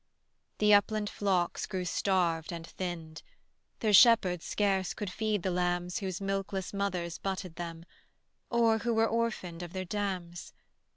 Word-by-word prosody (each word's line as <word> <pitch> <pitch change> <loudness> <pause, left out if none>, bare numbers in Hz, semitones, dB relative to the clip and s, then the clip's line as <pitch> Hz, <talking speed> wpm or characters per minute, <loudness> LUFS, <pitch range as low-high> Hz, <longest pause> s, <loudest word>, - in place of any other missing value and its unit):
The 210 0 +5
upland 210 0 +3
flocks 185 -4 0
grew 185 -3 -3
starved 175 -3 0
and 165 -1 -6
thinned: 165 -3 -6 0.6
Their 215 -2 +2
shepherds 195 -6 +6
scarce 195 -3 0
could 205 -3 -4
feed 215 -2 -1
the 185 - 0
lambs 175 0 -1
Whose 190 -2 -4
milkless 195 -1 -3
mothers 180 -4 -2
butted 190 -3 -4
them, 165 -1 -6 0.6
Or 230 -2 +3
who 235 +1 0
were 225 0 +4
orphaned 225 -7 -2
of 175 -1 -7
their 185 -1 -3
dams. 185 -3 -4
190 Hz, 140 wpm, -30 LUFS, 175-205 Hz, 0.6 s, shepherds